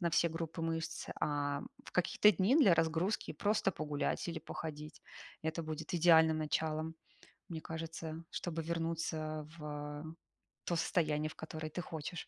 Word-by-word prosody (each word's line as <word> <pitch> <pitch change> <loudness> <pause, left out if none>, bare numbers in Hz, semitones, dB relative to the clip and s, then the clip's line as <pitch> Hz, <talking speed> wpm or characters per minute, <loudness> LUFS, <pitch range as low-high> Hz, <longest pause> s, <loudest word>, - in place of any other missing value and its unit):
на 170 -2 +1
все 170 +1 +4
группы 165 0 -4
мышц, 165 0 -2
а 145 -1 0 0.2
в - - -10
какие-то 185 +3 +5
дни 200 +7 +3
для 200 - +7
разгрузки 165 +5 +1
просто 205 -1 +2
погулять 150 +2 -1
или 165 - -2
походить. 155 -1 -6 0.4
Это 160 +1 -1
будет 155 +1 -4
идеальным 160 -2 +7
началом, 155 +1 0 0.6
мне 160 -2 -3
кажется, 165 0 -5
чтобы 165 -2 -3
вернуться 160 -2 -2
в 150 +1 -5 0.5
то 175 - +1
состояние, 155 -2 +1
в - - -11
которое 155 0 -5
ты 165 - -5
хочешь. 160 +1 -5
160 Hz, 140 wpm, -35 LUFS, 155-165 Hz, 0.6 s, для